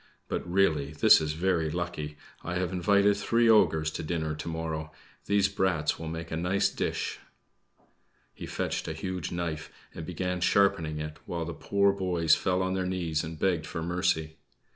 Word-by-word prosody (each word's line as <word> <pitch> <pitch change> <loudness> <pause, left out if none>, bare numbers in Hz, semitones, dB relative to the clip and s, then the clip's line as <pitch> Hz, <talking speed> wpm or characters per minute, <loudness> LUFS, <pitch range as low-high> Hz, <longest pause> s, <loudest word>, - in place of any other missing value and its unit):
But, 85 - -4
really, 75 -7 +2
this 75 - +6
is 75 -1 -1
very 85 -1 +1
lucky! 75 -3 -4 0.3
I 90 - -3
have 90 0 -1
invited 100 +3 +3
three 115 +3 +2
ogres 80 -8 +4
to - - -5
dinner 80 -1 -2
to 75 - -7
morrow; 80 -1 -4 0.4
these 100 -1 +3
brats 90 -5 0
will 80 - -5
make 80 +1 -5
a - - -1
nice 95 +4 +1
dish." - - -3 1.1
He - - -8
fetched - - -3
a - - -2
huge 95 -2 -4
knife 85 -3 -4 0.2
and 80 - -7
began 90 +1 -3
sharpening 85 -5 +2
it, 75 0 -5
while 85 -1 -3
the 85 - -5
poor 100 +3 +2
boys 90 -5 +2
fell 95 +1 +2
on 95 0 -1
their 95 -1 -1
knees 85 -4 -1
and 80 0 -6
begged 85 -2 0
for 80 -2 -4
mercy. 85 -2 0
85 Hz, 175 wpm, -28 LUFS, 80-95 Hz, 1.1 s, this